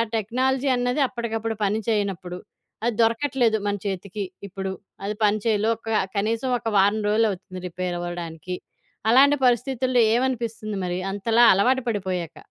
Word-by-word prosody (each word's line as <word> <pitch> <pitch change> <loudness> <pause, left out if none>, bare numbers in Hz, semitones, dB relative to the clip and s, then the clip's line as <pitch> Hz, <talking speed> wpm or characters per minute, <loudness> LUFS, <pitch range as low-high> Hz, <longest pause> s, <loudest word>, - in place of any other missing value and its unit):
Technology 260 +5 0
అన్నది 245 +3 0
అప్పటికప్పుడు 225 -2 -3
పని 210 +3 0
చేయనప్పుడు, 195 -4 -1 0.5
అది 235 -3 0
దొరకట్లేదు 230 0 +2
మన 205 - +1
చేతికి 195 +1 -4 0.2
ఇప్పుడు, 190 0 -4 0.3
అది 210 +1 -2
పని 210 +1 +2
చేయలో 220 0 +2
ఒక 225 0 -9 0.3
కనీసం 225 +5 0
ఒక - - -6
వారం 205 +2 +3
రోలవుతుంది 200 -4 0
రిపేర్ 180 0 -3
అవ్వడానికి. 175 0 -5 0.5
అలాంటి 280 +4 +6
పరిస్థితుల్లో 250 0 +1
ఏమనిపిస్తుంది? 230 -4 -1
మరి 180 0 -2
అంతలా 225 +4 +2
అలవాటు 255 +7 +2
పడిపోయాక. 185 -6 -3
220 Hz, 130 wpm, -24 LUFS, 195-240 Hz, 0.5 s, అలాంటి